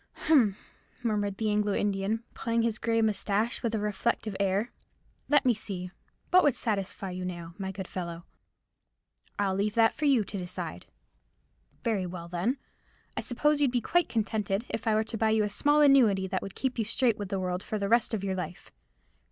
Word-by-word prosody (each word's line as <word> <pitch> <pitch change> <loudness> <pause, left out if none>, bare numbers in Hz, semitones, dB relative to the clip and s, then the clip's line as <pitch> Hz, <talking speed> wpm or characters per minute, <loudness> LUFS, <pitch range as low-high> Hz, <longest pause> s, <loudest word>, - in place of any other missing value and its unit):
"Humph!" 245 -11 +4 0.5
murmured 205 -3 0
the 215 -1 0
Anglo 210 -1 +1
Indian, 205 +2 0
pulling 230 0 0
his 230 -1 0
grey 230 -1 +1
moustaches 215 +2 0
with 230 -2 -1
a - - 0
reflective 210 0 -1
air. 200 +4 +1 0.6
"Let 290 -2 +4
me 250 - +5
see; 185 -4 -5 0.4
what 365 0 +7
would 290 -5 +4
satisfy 195 -3 -2
you, 180 0 -5
now, 170 -2 -6
my 190 -1 -3
good 190 -1 -6
fellow?" 170 -2 -5 1.1
"I 200 -1 +1
leave 200 +2 0
that 225 -1 +5
for 305 - -3
you 265 -6 +4
to 205 - -5
decide." 180 +1 -6 1.0
"Very 210 -6 0
well, 170 -1 -7
then. 180 +10 -1 0.6
I - - -1
suppose 295 +4 +1
you'd 280 - +4
be 245 0 +1
quite 350 +9 +1
contented 215 -1 -1
if 225 - -4
I 220 - +4
were 215 - +3
to 225 +1 -5
buy 220 - +3
you 220 -1 +3
a 210 - -1
small 290 +8 +3
annuity, 245 -10 +5
that 190 0 -2
would 195 - -7
keep 260 -2 -2
you - - +2
straight 230 0 +1
with 200 -2 -4
the 195 - -1
world 180 0 -2
for 215 - -3
the 200 -1 -1
rest 235 +2 +3
of 200 - -4
your 195 -1 -1
life. 180 -1 -6
210 Hz, 195 wpm, -29 LUFS, 190-230 Hz, 1.1 s, what